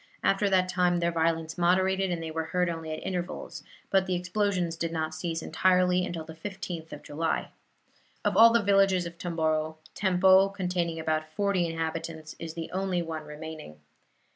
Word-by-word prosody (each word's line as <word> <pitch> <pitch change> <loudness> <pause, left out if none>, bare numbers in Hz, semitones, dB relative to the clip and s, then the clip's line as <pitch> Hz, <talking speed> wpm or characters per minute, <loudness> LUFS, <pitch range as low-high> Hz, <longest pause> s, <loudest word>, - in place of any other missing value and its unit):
After 200 +1 +2
that 185 -1 +3
time 180 -1 +2
their 170 0 +1
violence 165 0 0
moderated, 190 +2 +2
and 170 -2 -2
they 160 - -5
were 160 0 -2
heard 180 +1 0
only 165 -1 -5
at 155 - -5
intervals; 180 -1 -4 0.3
but 195 -1 +3
the 185 - 0
explosions 180 -1 0
did 165 0 -2
not 160 -1 -2
cease 165 0 -3
entirely 180 -1 +3
until 165 -2 -5
the 160 - -9
15th 165 -2 -6
of 145 - -9
July. 160 +2 -2 0.8
Of 205 -1 +2
all 230 +3 +9
the 235 -2 +3
villages 195 -2 +3
of 170 0 -8
Tomboro, 160 -2 -1 0.2
Tempo, 190 0 +5
containing 180 -4 -2
about 155 -1 -1
forty 200 -1 +1
inhabitants, 165 -1 -4
is 165 -1 -6
the 165 -1 -5
only 185 -2 -1
one 160 -2 -5
remaining. 150 - -8
175 Hz, 170 wpm, -28 LUFS, 160-185 Hz, 0.8 s, all